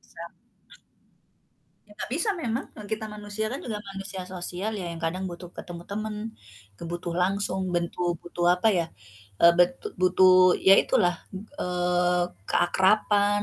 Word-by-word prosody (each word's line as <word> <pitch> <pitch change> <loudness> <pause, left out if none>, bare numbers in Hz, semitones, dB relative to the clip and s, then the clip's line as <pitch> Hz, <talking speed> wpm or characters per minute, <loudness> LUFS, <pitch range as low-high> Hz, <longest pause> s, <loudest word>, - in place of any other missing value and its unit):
Bisa. - - -8 1.6
Ya - - -19
enggak - - -6
bisa 335 +8 +2
memang, 235 +2 -2
orang 210 -1 -10
kita 220 0 -4
manusia 210 +1 -4
kan 270 - -4
juga 215 -3 -3
manusia 195 -1 -6
sosial 180 +4 -1
ya, 180 - -4
yang 165 - -7
kadang 185 +3 -2
butuh 175 0 -9
ketemu 175 -1 -8
temen, 215 +1 -4 0.6
kebutuh 170 0 -5
langsung, 190 0 0
bentu 175 0 -1
butuh 175 0 -3
apa 200 +5 +1
ya, 165 - 0 0.6
eee, 170 0 +8
betu 175 0 +2
butuh 185 0 +6
ya 195 - +10
itulah, 175 0 +2 0.5
eee, 180 0 +1 0.3
keakraban, 205 +3 +3
185 Hz, 140 wpm, -26 LUFS, 175-205 Hz, 1.6 s, ya